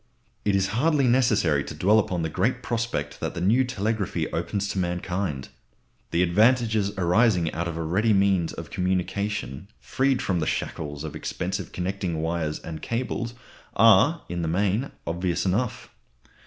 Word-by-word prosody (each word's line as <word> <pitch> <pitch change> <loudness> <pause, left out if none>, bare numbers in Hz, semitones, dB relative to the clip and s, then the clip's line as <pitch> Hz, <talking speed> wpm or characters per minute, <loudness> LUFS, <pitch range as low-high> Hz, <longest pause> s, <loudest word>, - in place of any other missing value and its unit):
It 100 -1 +2
is 95 0 +1
hardly 145 +3 +2
necessary 110 - +3
to - - -8
dwell 105 +4 +4
upon 90 -5 -1
the - - 0
great - - 0
prospect 120 0 -2
that - - -3
the - - -3
new 110 +9 +3
telegraphy 105 -8 -2
opens 95 +4 -2
to 95 - -2
mankind. 90 -4 -2 0.6
The 85 - +2
advantages 110 +2 +3
arising 90 -1 +3
out 85 +2 -2
of 85 -1 -4
a 85 - -2
ready 100 +8 +1
means 95 -4 +3
of - - -8
communication, 95 -2 -2
freed 135 -1 +1
from 90 -3 0
the 75 - -1
shackles 75 -1 -3
of 80 - -6
expensive - - -4
connecting 90 -2 -3
wires 80 -1 -1
and 80 -2 -8
cables 120 0 -3 0.4
are, - - +5
in 85 0 -3
the 80 - -1
main, 100 +9 0 0.2
obvious 85 +2 -1
enough. 105 +5 -1
95 Hz, 155 wpm, -25 LUFS, 85-110 Hz, 0.6 s, are